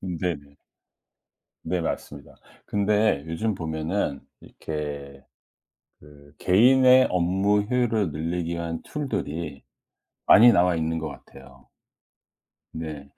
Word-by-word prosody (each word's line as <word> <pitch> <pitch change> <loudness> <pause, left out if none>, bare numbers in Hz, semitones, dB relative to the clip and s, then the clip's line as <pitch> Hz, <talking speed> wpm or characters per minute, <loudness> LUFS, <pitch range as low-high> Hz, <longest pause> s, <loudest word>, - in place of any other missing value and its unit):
네네. 85 -6 -5 1.1
네, 90 -1 -2
맞습니다. 75 -3 -6 0.3
근데 105 -6 +1
요즘 95 +7 -2
보면은 80 -2 -3 0.2
이렇게 70 -3 -7 0.8
그 75 -1 -18
개인의 130 +6 +5
업무 95 +4 +1
효율을 110 -5 0
늘리기 85 +3 -3
위한 85 -1 -4
툴들이 85 - -5 0.6
많이 120 +3 +8
나와 90 -3 +3
있는 80 0 -2
것 80 - -4
같아요. 65 0 -15 1.1
네. 75 -3 -7
85 Hz, 205 characters per minute, -24 LUFS, 75-100 Hz, 1.1 s, 많이